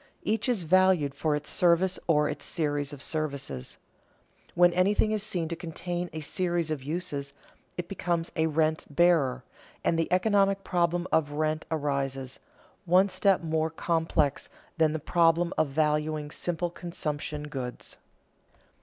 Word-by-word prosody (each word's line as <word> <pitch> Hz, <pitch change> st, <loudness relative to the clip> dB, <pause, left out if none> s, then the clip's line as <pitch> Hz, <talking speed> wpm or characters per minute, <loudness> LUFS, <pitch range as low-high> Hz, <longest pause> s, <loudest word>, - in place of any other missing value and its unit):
Each 220 Hz, +4 st, 0 dB
is 225 Hz, -8 st, +1 dB
valued 180 Hz, -4 st, +3 dB
for 155 Hz, 0 st, 0 dB
its 150 Hz, -, -3 dB
service 180 Hz, +2 st, +3 dB
or 150 Hz, -3 st, +3 dB
its -, -, -5 dB
series 145 Hz, -3 st, -1 dB
of 145 Hz, -2 st, -7 dB
services. 140 Hz, -, -3 dB, 0.8 s
When 175 Hz, 0 st, +5 dB
anything 200 Hz, +4 st, +2 dB
is 215 Hz, -1 st, 0 dB
seen 175 Hz, -5 st, -2 dB
to 170 Hz, -, -3 dB
contain 175 Hz, +1 st, -4 dB
a 160 Hz, -, -6 dB
series 170 Hz, +1 st, 0 dB
of 150 Hz, -3 st, -2 dB
uses, 145 Hz, -2 st, -4 dB, 0.4 s
it 175 Hz, -1 st, -4 dB
becomes 170 Hz, -3 st, -2 dB
a 160 Hz, -1 st, +2 dB
rent 155 Hz, 0 st, 0 dB
bearer, 145 Hz, -5 st, +3 dB, 0.4 s
and 165 Hz, -, +1 dB
the 165 Hz, -, -1 dB
economic 195 Hz, +1 st, +2 dB
problem 175 Hz, -1 st, 0 dB
of 145 Hz, -2 st, +1 dB
rent 155 Hz, +1 st, -1 dB
arises, 140 Hz, -4 st, -2 dB, 0.5 s
one 185 Hz, +3 st, +4 dB
step 190 Hz, 0 st, +2 dB
more 160 Hz, 0 st, 0 dB
complex 160 Hz, -3 st, 0 dB, 0.3 s
than 155 Hz, -1 st, +4 dB
the -, -, -1 dB
problem 170 Hz, +2 st, +2 dB
of 155 Hz, -, +2 dB
valuing 150 Hz, +1 st, 0 dB
simple 175 Hz, +1 st, -2 dB
consumption 150 Hz, -4 st, -4 dB
goods. 130 Hz, -5 st, -6 dB
160 Hz, 145 wpm, -28 LUFS, 150-175 Hz, 0.8 s, When